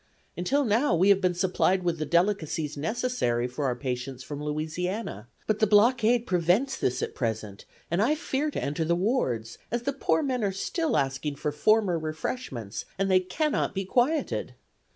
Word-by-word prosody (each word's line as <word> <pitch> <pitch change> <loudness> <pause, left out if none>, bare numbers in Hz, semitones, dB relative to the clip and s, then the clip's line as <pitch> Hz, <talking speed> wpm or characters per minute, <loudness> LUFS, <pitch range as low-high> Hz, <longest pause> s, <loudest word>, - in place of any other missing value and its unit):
Until 270 +11 +1
now 225 -1 +2
we 185 +4 +4
have 200 -1 +5
been 180 -2 +1
supplied 185 0 +1
with 170 -2 -1
the 155 - -2
delicacies 170 -4 +1
necessary 155 - -1
for 125 +3 -4
our 125 -2 +1
patients 125 0 -4
from 145 +1 -6
Louisiana, 155 - -3 0.2
but 215 -1 0
the 215 - +4
blockade 230 +2 +4
prevents 185 +9 +2
this 125 - -1
at - - -3
present 110 -4 -4 0.3
and 170 +3 +2
I 270 +8 +3
fear 300 -1 -1
to - - -4
enter 145 +3 -1
the 170 +2 +2
wards, 170 - -1
as 240 +1 -2
the 280 - -1
poor 280 +3 +1
men 255 -4 -1
are 200 - +1
still 315 - -1
asking 135 +1 -1
for 150 - -2
former 190 +3 +2
refreshments, 155 - -4
and 195 0 +1
they 185 - +6
cannot 245 - -1
be 195 0 -2
quieted. 260 - 0
180 Hz, 175 wpm, -27 LUFS, 150-230 Hz, 0.3 s, they